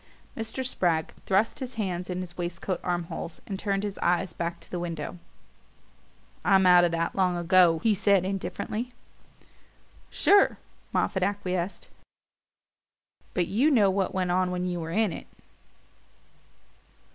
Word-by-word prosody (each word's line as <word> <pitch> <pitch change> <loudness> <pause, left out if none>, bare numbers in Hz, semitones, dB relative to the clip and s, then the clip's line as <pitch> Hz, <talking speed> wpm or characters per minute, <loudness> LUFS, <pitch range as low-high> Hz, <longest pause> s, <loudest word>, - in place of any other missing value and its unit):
Mr. 225 +4 -4
Spragg 170 -9 0
thrust 200 +7 +2
his 260 -2 -6
hands 185 -4 -3
in 180 0 -2
his 175 -1 -8
waistcoat 175 +1 -3
arm 175 -1 -1
holes 165 0 -7
and 195 -2 -5
turned 200 -1 -1
his 205 -2 -4
eyes 180 +2 +1
back 170 0 -3
to - - -14
the 180 - -3
window. 170 0 -5 1.2
"I'm 190 -1 +4
out 180 -1 +7
of 175 - +2
that 165 0 -1
long 185 -2 +2
ago," 175 -1 +5
he 225 - +4
said 200 -2 +3
indifferently. 205 +4 -3 1.2
"Sure," 405 0 +4 0.3
Moffatt 190 - 0
acquiesced; 185 -2 -2 1.5
"but 180 - +2
you 235 - +2
know 210 -9 +4
what 190 0 0
went 185 -2 -1
on 185 0 +2
when 180 0 -2
you 175 -1 -2
were 160 -1 -5
in 205 +1 +1
it." - - -8
185 Hz, 145 wpm, -27 LUFS, 175-200 Hz, 1.5 s, out